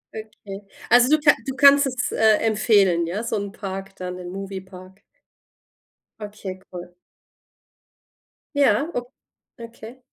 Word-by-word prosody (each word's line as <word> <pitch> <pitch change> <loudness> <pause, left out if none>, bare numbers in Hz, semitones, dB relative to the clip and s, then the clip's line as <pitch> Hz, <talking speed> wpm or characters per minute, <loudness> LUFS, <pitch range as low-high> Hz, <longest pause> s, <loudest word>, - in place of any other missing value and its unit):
Okay. 210 -2 -9 0.3
Also 245 +2 +6
du 310 - +4
ka 295 -1 +5
du 265 - -4
kannst 280 0 +6
es, 250 -2 -3
äh, 220 -1 +3
empfehlen, 200 -6 +2
ja? 205 +7 -4
So 230 - -3
'n 200 -1 -4
Park 195 -2 -7
dann, 180 0 -6
den 180 -1 -8
Movie 195 0 -7
Park? 185 0 -15 1.2
Okay, 205 -3 -8
cool. 175 0 -9 1.6
Ja, 280 +1 +2
o 245 +1 -5 0.5
okay. 230 +2 -12
210 Hz, 130 wpm, -22 LUFS, 190-245 Hz, 1.6 s, Also